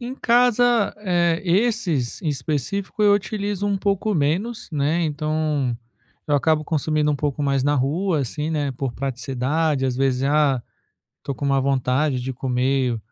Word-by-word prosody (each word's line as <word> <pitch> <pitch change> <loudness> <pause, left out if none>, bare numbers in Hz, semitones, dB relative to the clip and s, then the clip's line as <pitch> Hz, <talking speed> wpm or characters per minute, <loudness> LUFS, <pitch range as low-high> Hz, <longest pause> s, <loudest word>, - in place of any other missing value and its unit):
Em 250 +2 -5
casa, 245 -2 +3
eh, 175 -4 +1
esses, 180 - 0
em 160 - -2
específico, 150 - -2
eu 205 -1 +6
utilizo 205 -1 -2
um 200 -1 0
pouco 200 +2 0
menos, 175 +11 -1
né, 150 +4 +1
então 150 -4 -1 0.5
eu 145 - +1
acabo 155 +1 +2
consumindo 155 -1 0
um - - -1
pouco 145 0 -2
mais 140 -2 +1
na 145 +1 +2
rua, 155 +6 0
assim, 150 +5 -3
né, 145 -3 -1
por 130 -1 -4
praticidade. 135 +3 -1
Às 125 -1 -2
vezes, 135 -1 +1
ah, 140 -4 +2 0.6
tô 140 - -4
com 140 - -6
uma 135 -1 +2
vontade 130 0 +1
de 130 +1 -4
comer 130 -1 0
150 Hz, 155 wpm, -22 LUFS, 135-185 Hz, 0.6 s, eu